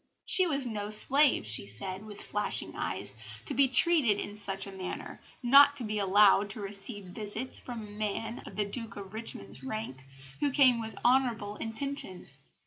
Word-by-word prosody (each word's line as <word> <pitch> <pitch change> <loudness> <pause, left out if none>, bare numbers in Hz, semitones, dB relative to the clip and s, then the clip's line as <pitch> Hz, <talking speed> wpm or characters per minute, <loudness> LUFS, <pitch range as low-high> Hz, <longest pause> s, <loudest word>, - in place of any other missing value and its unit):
She 370 -1 +7
was 280 -4 -1
no 210 -3 -4
slave, 270 - +3
she 110 -2 +2
said, 185 - -3
with 210 -1 -9
flashing 210 0 -3
eyes, - - -1 0.3
to - - -4
be 275 +1 +4
treated 260 -4 +3
in 205 - -6
such 195 -2 -2
a 195 - -8
manner, 190 -1 -7 0.2
not 280 +3 +7
to 255 - 0
be 215 -1 -2
allowed 200 +1 +4
to 215 - -5
receive 200 +1 -6
visits 215 +6 -5
from 240 -3 -7
a 205 - -12
man 215 +2 -4
of - - -10
the 210 +1 0
Duke 225 +2 0
of 195 -1 -9
Richmond's 225 +3 -4
rank, 215 - -6 0.4
who 290 - +1
came 255 -3 +4
with 220 -2 -6
honourable 240 -5 +2
intentions. 225 - -5
215 Hz, 175 wpm, -30 LUFS, 200-250 Hz, 0.4 s, She